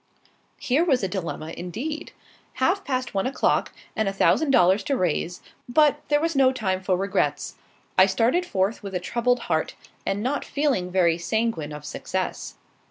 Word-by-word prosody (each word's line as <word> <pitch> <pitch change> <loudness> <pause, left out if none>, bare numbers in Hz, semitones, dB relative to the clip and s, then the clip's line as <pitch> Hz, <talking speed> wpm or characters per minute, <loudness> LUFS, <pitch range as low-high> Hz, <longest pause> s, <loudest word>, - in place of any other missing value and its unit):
Here 275 +6 +1
was 270 - +2
a - - +1
dilemma, 170 -4 -5
indeed. 275 - -5 0.4
Half 355 +10 +1
past 255 -4 -2
one 195 +4 0
o'clock, 270 - +1 0.2
and 220 -2 +1
a - - -2
thousand 285 +9 +2
dollars 190 -5 +5
to 275 - 0
raise; 175 -1 -1 0.3
but 295 +2 +4
there 295 0 +3
was 330 0 -1
no 265 -1 +5
time 190 -7 -1
for 185 -1 +1
regrets. 195 +2 -1 0.5
I 185 - +8
started 230 - +2
forth 200 - -1
with 195 -2 -6
a - - +1
troubled 240 +6 0
heart, 160 -5 -1 0.3
and 200 +2 -2
not 280 +4 -1
feeling 275 -11 0
very 175 -2 +2
sanguine 220 -5 -1
of 150 0 -8
success. - - -4
220 Hz, 165 wpm, -24 LUFS, 185-270 Hz, 0.5 s, I